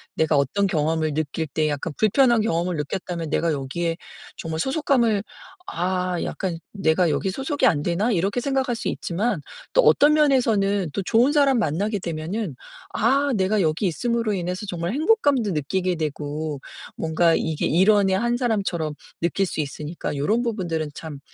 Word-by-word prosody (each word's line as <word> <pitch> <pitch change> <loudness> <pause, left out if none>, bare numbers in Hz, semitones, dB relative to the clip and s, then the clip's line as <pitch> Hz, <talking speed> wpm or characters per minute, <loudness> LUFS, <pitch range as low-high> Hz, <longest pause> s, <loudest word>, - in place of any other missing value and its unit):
내가 160 -1 +2
어떤 140 +9 +1
경험을 155 -3 0
느낄 155 +1 -2
때 155 +2 0
약간 145 +2 -3
불편한 240 +2 +4
경험을 175 -3 0
느꼈다면 165 +2 -4
내가 165 +2 +1
여기에 165 +5 -2 0.4
정말 160 -1 -4
소속감을 245 - +1 0.4
'아 180 0 -1
약간 185 -4 -3 0.2
내가 180 -3 +2
여기 190 +5 0
소속이 270 +6 -1
안 155 -10 +2
되나?' 185 +8 0
이렇게 195 +6 0
생각할 265 -2 0
수 - - -4
있지만 205 +8 -2 0.3
또 - - +6
어떤 300 -10 +5
면에서는 220 - +2
또 - - -1
좋은 235 +8 +3
사람 275 -4 +4
만나게 205 +4 0
되면은 170 - -4 0.4
'아 275 +5 +2
내가 200 +2 +1
여기 160 +4 +1
있음으로 230 +5 -1
인해서 180 +1 -3
정말 175 +1 -3
행복감도 285 - +2
느끼게 180 +4 -1
되고 150 -1 -4 0.4
뭔가 165 +1 +2
이게 160 -2 -1
일원의 195 +2 +4
한 240 +3 0
사람처럼 195 - -1 0.3
느낄 175 +4 +1
수 175 - -5
있으니까.' 150 +2 -5
요런 210 +12 +1
부분들은 175 -9 -2
참 155 -3 -8
185 Hz, 345 characters per minute, -23 LUFS, 160-230 Hz, 0.4 s, 또